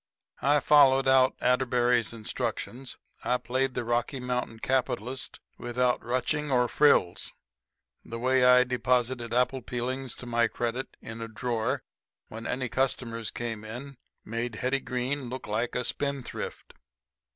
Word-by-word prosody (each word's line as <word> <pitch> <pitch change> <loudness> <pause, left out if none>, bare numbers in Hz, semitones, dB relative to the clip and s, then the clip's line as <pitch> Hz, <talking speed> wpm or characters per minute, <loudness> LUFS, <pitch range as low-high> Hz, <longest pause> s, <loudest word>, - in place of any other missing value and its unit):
I 145 +2 +4
followed 135 -3 +6
out 130 -1 +5
Atterbury's 125 -2 +2
instructions. 115 +2 -4 0.3
I 125 - +2
played 130 +2 -1
the - - -1
Rocky 120 +3 -1
Mountain 125 -2 -2
capitalist 130 0 -2 0.2
without 125 +1 0
ruching 145 +5 -1
or 125 -2 +3
frills. 115 -12 +3 0.7
The 115 - -6
way 130 +2 +3
I 125 0 +7
deposited 125 -1 0
apple 125 +2 +1
peelings 125 +2 -3
to - - -10
my 120 -1 +2
credit 120 +3 -3
in 115 +1 -7
a 115 - -4
drawer 115 0 -2 0.5
when 115 +1 -7
any 125 0 -1
customers 115 -3 -1
came 115 -3 -4
in 125 +5 -8 0.3
made 115 +1 -3
Hetty 130 +4 0
Green 125 +1 -2
look 130 +1 -6
like 110 +3 -2
a 125 - -1
spendthrift. 140 -3 -4
125 Hz, 135 wpm, -28 LUFS, 120-130 Hz, 0.7 s, I